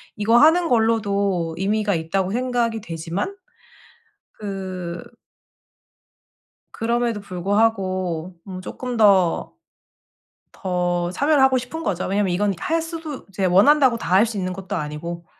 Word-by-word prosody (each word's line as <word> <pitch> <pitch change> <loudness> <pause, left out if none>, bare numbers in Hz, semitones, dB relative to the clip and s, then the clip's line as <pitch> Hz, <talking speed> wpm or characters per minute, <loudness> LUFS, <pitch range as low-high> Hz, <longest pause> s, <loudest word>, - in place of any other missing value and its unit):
'이거 220 +2 +2
하는 330 +5 +5
걸로도 200 - +1
의미가 205 +1 +1
있다.'고 180 +4 -1
생각이 240 -2 -1
되지만 170 - -4 1.0
그 185 -4 -6 1.7
그럼에도 235 -1 -1
불구하고 185 -3 -1
뭐 185 -1 -8
쪼끔 245 +5 -5
더 195 -5 +3 1.0
더 175 -2 -1
참여를 285 +6 +3
하고 265 -1 +4
싶은 285 +7 -5
거죠. 185 -3 -1
왜냐하면 195 -1 0
이건 200 +3 +1
할 330 - -1
수도 325 -4 -7
이제 195 0 -5
원한다고 235 +7 +5
다 170 -4 -3
할 200 +4 +6
수 225 -2 -5
있는 185 -1 -2
것도 190 0 -5
아니고 170 +3 -5
200 Hz, 260 characters per minute, -22 LUFS, 180-235 Hz, 1.7 s, 할